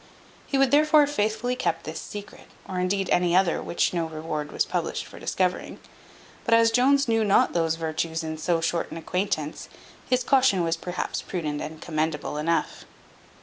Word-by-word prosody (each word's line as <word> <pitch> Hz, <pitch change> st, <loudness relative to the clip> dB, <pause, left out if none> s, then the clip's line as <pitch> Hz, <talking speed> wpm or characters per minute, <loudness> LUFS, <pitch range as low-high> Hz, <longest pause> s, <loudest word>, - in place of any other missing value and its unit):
He 275 Hz, -, 0 dB
would 270 Hz, -1 st, +3 dB
therefore 305 Hz, +1 st, +6 dB
have 290 Hz, 0 st, +1 dB
faithfully 220 Hz, +2 st, 0 dB
kept 165 Hz, -10 st, -1 dB
this 155 Hz, -, -6 dB
secret, 205 Hz, -1 st, -9 dB, 0.2 s
or 185 Hz, -1 st, -3 dB
indeed 190 Hz, +1 st, 0 dB
any 175 Hz, -1 st, +3 dB
other 185 Hz, -2 st, +3 dB
which 170 Hz, -, 0 dB
no 170 Hz, -2 st, -1 dB
reward 155 Hz, -2 st, -5 dB
was -, -, +1 dB
published -, -, -2 dB
for -, -, -12 dB
discovering. 180 Hz, -1 st, -1 dB, 0.7 s
But 230 Hz, -, +4 dB
as 230 Hz, 0 st, +5 dB
Jones 270 Hz, +3 st, +3 dB
knew 225 Hz, -1 st, +2 dB
not 205 Hz, -2 st, +3 dB
those 165 Hz, -2 st, +1 dB
virtues 160 Hz, 0 st, -2 dB
in 155 Hz, 0 st, -5 dB
so 165 Hz, +1 st, +1 dB
short 165 Hz, +1 st, -1 dB
an -, -, -6 dB
acquaintance, 165 Hz, -3 st, -3 dB, 0.4 s
his 255 Hz, 0 st, +2 dB
caution 255 Hz, -9 st, +3 dB
was 165 Hz, 0 st, +1 dB
perhaps 175 Hz, +2 st, -4 dB
prudent 155 Hz, -5 st, -3 dB
and 155 Hz, +1 st, -6 dB
commendable 155 Hz, -2 st, -2 dB
enough. 165 Hz, +2 st, -1 dB
180 Hz, 175 wpm, -25 LUFS, 160-225 Hz, 0.7 s, therefore